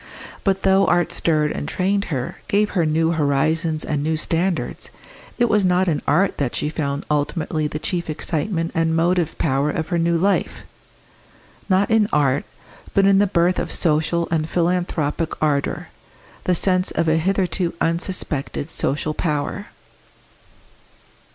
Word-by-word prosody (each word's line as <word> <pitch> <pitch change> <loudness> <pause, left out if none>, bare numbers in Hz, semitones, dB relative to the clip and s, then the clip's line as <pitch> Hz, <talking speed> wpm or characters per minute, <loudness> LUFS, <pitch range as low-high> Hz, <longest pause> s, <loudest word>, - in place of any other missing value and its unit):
But 195 -1 0
though 195 0 +4
art 175 0 +2
stirred 155 -3 +1
and - - -4
trained 200 +2 0
her, 130 -5 -4
gave 205 +1 +2
her 170 -5 +1
new 160 +2 +2
horizons 155 +1 0
and 150 -2 -1
new 160 +2 0
standards, 170 +2 -2 0.5
it 240 - +3
was 210 -2 +2
not 180 0 +2
in 155 -4 0
art 185 +6 +2
that 135 -4 -1
she 150 - -1
found 140 -2 -3
ultimately 155 +1 -1
the 150 - -4
chief 170 +2 -3
excitement 165 +2 -2
and 165 -1 +1
motive 170 -1 +1
power 140 -1 +1
of 160 +1 -3
her 175 -2 0
new 170 0 +2
life 195 +4 0 1.1
not 195 +2 +2
in 220 -2 +3
art, 140 -2 +2 0.5
but 195 - +4
in 195 0 +5
the 205 - +4
birth 180 -1 +2
of - - -3
social 160 +1 +1
and 160 -1 0
philanthropic 170 -3 -1
ardour, 145 -2 -1 0.6
the 180 - +2
sense 185 +1 +2
of 165 +1 -1
a 160 0 +3
hitherto 180 0 0
unsuspected 165 -3 -2
social 150 +2 -1
power. 155 +6 -2
165 Hz, 150 wpm, -21 LUFS, 155-185 Hz, 1.1 s, in